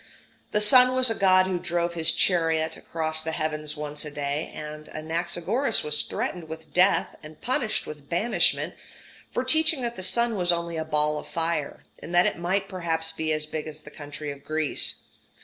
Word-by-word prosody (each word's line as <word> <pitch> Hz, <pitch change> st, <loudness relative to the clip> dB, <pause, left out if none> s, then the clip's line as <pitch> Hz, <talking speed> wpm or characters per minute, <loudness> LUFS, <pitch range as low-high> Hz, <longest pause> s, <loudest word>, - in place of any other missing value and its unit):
The 210 Hz, -, +1 dB
sun 250 Hz, +4 st, +7 dB
was 255 Hz, -2 st, +6 dB
a -, -, +2 dB
god 185 Hz, -3 st, +4 dB
who 185 Hz, -1 st, -2 dB
drove 170 Hz, 0 st, -2 dB
his 165 Hz, -1 st, +3 dB
chariot 160 Hz, -3 st, +2 dB
across 160 Hz, -1 st, -3 dB
the 160 Hz, 0 st, -4 dB
heavens 155 Hz, -1 st, -3 dB
once 150 Hz, 0 st, -3 dB
a 150 Hz, -, -5 dB
day; 145 Hz, +1 st, -3 dB
and 150 Hz, 0 st, -8 dB
Anaxagoras 175 Hz, -, -1 dB
was 150 Hz, 0 st, 0 dB
threatened 175 Hz, -2 st, -4 dB
with 160 Hz, -2 st, -10 dB
death 185 Hz, +2 st, +3 dB
and 155 Hz, 0 st, -13 dB
punished 250 Hz, -3 st, -1 dB
with 150 Hz, -2 st, -10 dB
banishment 205 Hz, +8 st, +1 dB, 0.6 s
for 250 Hz, -, -1 dB
teaching 315 Hz, +2 st, +3 dB
that 235 Hz, -1 st, -3 dB
the -, -, -6 dB
sun 225 Hz, +5 st, +2 dB
was 175 Hz, -1 st, +3 dB
only 170 Hz, 0 st, -3 dB
a 160 Hz, -, -3 dB
ball 150 Hz, -1 st, +2 dB
of -, -, -11 dB
fire, 165 Hz, -3 st, -2 dB, 0.2 s
and 175 Hz, -, -5 dB
that 175 Hz, -, +6 dB
it -, -, -1 dB
might 190 Hz, +3 st, -1 dB
perhaps 165 Hz, -4 st, -1 dB
be 160 Hz, -1 st, -3 dB
as 155 Hz, 0 st, 0 dB
big 155 Hz, 0 st, -5 dB
as 155 Hz, 0 st, -8 dB
the -, -, -13 dB
country 145 Hz, 0 st, -7 dB
of 140 Hz, 0 st, -11 dB
Greece. 155 Hz, 0 st, +1 dB
165 Hz, 190 wpm, -25 LUFS, 155-185 Hz, 0.6 s, sun